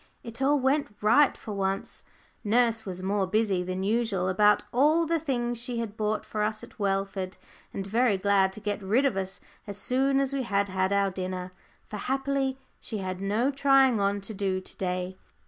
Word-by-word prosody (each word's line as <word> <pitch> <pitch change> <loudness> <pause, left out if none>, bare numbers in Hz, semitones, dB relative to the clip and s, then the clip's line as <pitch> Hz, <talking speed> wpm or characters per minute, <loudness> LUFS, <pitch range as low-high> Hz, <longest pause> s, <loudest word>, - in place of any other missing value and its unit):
It 230 +2 -6
all 285 +2 +3
went 270 -3 +1
right 240 +7 +4
for 215 - -7
once. 195 0 -2 0.4
Nurse 225 0 +2
was 185 -1 -5
more 195 0 0
busy 205 -2 +1
than 185 +1 -3
usual 205 -3 0
about 210 +2 +4
all 305 +6 +4
the 330 +1 +1
things 240 -6 -2
she 240 0 -3
had 225 -3 -4
bought 215 -1 -1
for 215 - -3
us 215 0 -1
at - - -13
Welford, 195 -1 -1 0.3
and 195 - -4
very 220 +1 +2
glad 195 0 +3
to 215 - -8
get 205 0 -3
rid 220 +8 +2
of 270 - +2
us 190 0 -4 0.3
as 200 -1 -5
soon 265 +6 +1
as 275 0 0
we 275 - 0
had 200 -4 0
had 190 0 0
our 200 -1 +2
dinner. 185 0 -4 0.4
For, 210 - -6
happily, 270 +3 -1 0.2
she 220 - -4
had 185 -1 -4
no 215 +7 +1
trying 270 -4 +4
on 200 0 +1
to 195 +3 -6
do 190 -2 -1
to 185 - -8
day. 180 0 -3
210 Hz, 195 wpm, -27 LUFS, 195-250 Hz, 0.4 s, right